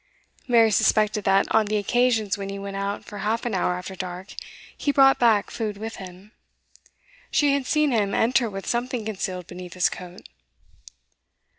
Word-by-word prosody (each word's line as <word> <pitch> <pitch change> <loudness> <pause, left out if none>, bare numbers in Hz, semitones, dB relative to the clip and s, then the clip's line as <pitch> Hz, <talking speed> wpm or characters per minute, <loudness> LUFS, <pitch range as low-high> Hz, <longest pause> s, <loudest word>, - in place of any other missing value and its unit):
Mary 230 -3 +5
suspected 210 0 +2
that, 195 0 +4
on 220 -1 +3
the 215 +1 0
occasions 225 -1 +1
when 195 -1 -6
he 200 - -5
went 200 0 -6
out 200 +1 -3
for 205 - -9
half 220 +4 -1
an 240 - -2
hour 180 -1 0
after 180 +1 -7
dark, 185 +1 -7 0.4
he 285 - 0
brought 270 -1 +5
back 225 -4 +3
food 215 -3 -4
with 220 +2 -6
him: 190 +2 -11 1.0
she 290 -2 +3
had 280 -2 -1
seen 300 -2 +2
him 205 -4 +1
enter 240 0 +2
with 195 -1 -7
something 240 -1 -2
concealed 190 -4 -4
beneath 180 0 -10
his 180 - +3
coat. 180 0 -10
210 Hz, 170 wpm, -24 LUFS, 195-235 Hz, 1.0 s, Mary